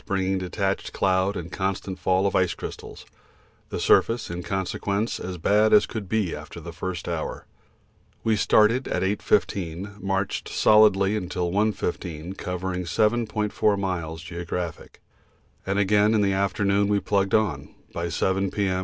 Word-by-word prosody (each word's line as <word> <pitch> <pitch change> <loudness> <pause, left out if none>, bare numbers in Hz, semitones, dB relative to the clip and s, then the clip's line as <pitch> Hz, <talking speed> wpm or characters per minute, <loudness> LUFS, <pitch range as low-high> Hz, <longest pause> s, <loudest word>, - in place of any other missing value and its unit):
bringing 95 -1 0
detached 95 +1 -2
cloud 95 +1 +1
and 85 0 -6
constant 95 0 -3
fall 95 +1 +2
of 100 - 0
ice 90 -1 +2
crystals. - - -8 0.6
The - - -4
surface, 115 -5 +3
in 85 +1 -4
consequence, 100 +3 -2
as 90 0 -5
bad 105 +6 +3
as 105 - +7
could 105 -5 -6
be 105 -6 0
after 75 +3 -9
the 85 +1 -8
first 90 0 -5
hour. 85 -2 -4 0.8
We 110 -1 +2
started 110 +5 +3
at - - -1
8.15, 100 -1 -1
marched 95 0 -2
solidly 105 -2 +5 0.2
till 90 -1 -2
1.15, 90 -4 -2
covering 90 0 -3
7.4 105 +1 +1
miles 85 -4 -3
(geo.), 85 0 -6 1.2
and 95 +1 0
again 105 +2 +3
in 105 - +3
the 100 -1 +2
afternoon 100 +1 +1
we 105 0 +2
plugged 100 -1 +1
on; 110 -3 0 0.2
by 85 0 -3
7 95 +3 0
P.M. 95 -2 0
95 Hz, 145 wpm, -25 LUFS, 90-105 Hz, 1.2 s, as